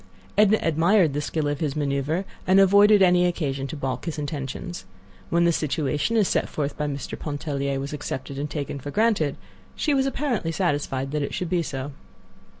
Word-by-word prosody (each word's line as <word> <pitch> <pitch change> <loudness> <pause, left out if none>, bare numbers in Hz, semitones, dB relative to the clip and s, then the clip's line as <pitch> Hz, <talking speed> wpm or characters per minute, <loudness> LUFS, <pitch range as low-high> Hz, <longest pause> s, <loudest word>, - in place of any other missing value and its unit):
Edna 210 +1 +5
admired 165 +1 +3
the 145 - -1
skill 150 0 -2
of 145 -1 -2
his 150 -4 -1
maneuver, 145 +5 -1 0.2
and 190 +1 +6
avoided 200 +1 +6
any 180 -1 +5
occasion 140 -6 -2
to 160 - -6
balk 130 -3 -3
his 165 -2 -4
intentions. 150 +4 -5 0.5
When 170 0 +3
the 170 - +4
situation 155 +6 0
as 210 -4 +4
set - - 0
forth 145 -1 -3
by 150 - -2
Mr. 140 -2 -5
Pontellier 140 -2 -2
was 140 +2 -5
accepted 140 -1 -5
and 145 +1 -3
taken 140 -1 -4
for 145 - -7
granted, 205 -7 +1 0.4
she 300 - +1
was 270 -1 +2
apparently 255 - -1
satisfied 145 -6 -1
that 150 0 -1
it 140 - -3
should 180 -1 -3
be 180 -2 +2
so. 140 -2 -4
150 Hz, 185 wpm, -24 LUFS, 140-180 Hz, 0.5 s, and